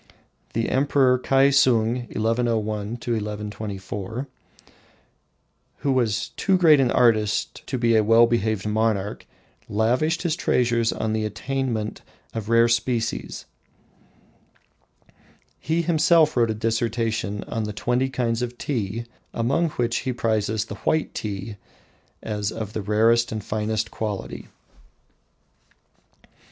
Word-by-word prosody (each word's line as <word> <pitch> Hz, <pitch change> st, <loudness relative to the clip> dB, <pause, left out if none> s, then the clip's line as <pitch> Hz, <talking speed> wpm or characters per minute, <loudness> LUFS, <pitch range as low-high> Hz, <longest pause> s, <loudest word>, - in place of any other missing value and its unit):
The 115 Hz, 0 st, 0 dB
Emperor 130 Hz, -2 st, +3 dB
Kiasung 125 Hz, -3 st, +3 dB
(1101 115 Hz, 0 st, 0 dB, 0.3 s
1124), 105 Hz, 0 st, -4 dB, 1.5 s
who 140 Hz, -, +1 dB
was 120 Hz, -5 st, 0 dB
too 190 Hz, -1 st, +1 dB
great 160 Hz, -5 st, +6 dB
an 130 Hz, -3 st, +3 dB
artist 110 Hz, -4 st, +2 dB
to 130 Hz, -, -2 dB
be 115 Hz, -1 st, +2 dB
a 110 Hz, -, +4 dB
well 115 Hz, +2 st, +6 dB
behaved 110 Hz, -3 st, 0 dB
monarch, 105 Hz, -2 st, -1 dB, 0.4 s
lavished 125 Hz, -, +1 dB
his 165 Hz, -3 st, 0 dB
treasures 120 Hz, -7 st, +1 dB
on 110 Hz, -1 st, -2 dB
the 110 Hz, 0 st, 0 dB
attainment 115 Hz, 0 st, -3 dB, 0.3 s
of 110 Hz, -1 st, -5 dB
rare 115 Hz, 0 st, +5 dB
species. 115 Hz, -1 st, -1 dB, 2.1 s
He 165 Hz, +2 st, 0 dB
himself 160 Hz, -1 st, +4 dB
wrote 120 Hz, -2 st, +3 dB
a 110 Hz, -, -1 dB
dissertation 115 Hz, -2 st, -1 dB
on 110 Hz, -1 st, -3 dB
the 105 Hz, -, -4 dB
twenty 125 Hz, +5 st, 0 dB
kinds 120 Hz, -3 st, -1 dB
of 125 Hz, 0 st, -4 dB
tea, 115 Hz, -4 st, -3 dB, 0.3 s
among 135 Hz, +9 st, +1 dB
which 120 Hz, -4 st, -1 dB
he 130 Hz, -, -2 dB
prizes 110 Hz, -2 st, 0 dB
the 105 Hz, -, -7 dB
"white 155 Hz, 0 st, 0 dB
tea" 105 Hz, 0 st, -5 dB, 0.7 s
as 105 Hz, -1 st, -2 dB
of 110 Hz, -2 st, -6 dB
the 110 Hz, -, -2 dB
rarest 115 Hz, +3 st, +3 dB
and 110 Hz, -2 st, -4 dB
finest 110 Hz, +1 st, -2 dB
quality. 105 Hz, -3 st, -5 dB
115 Hz, 115 wpm, -24 LUFS, 110-125 Hz, 2.1 s, great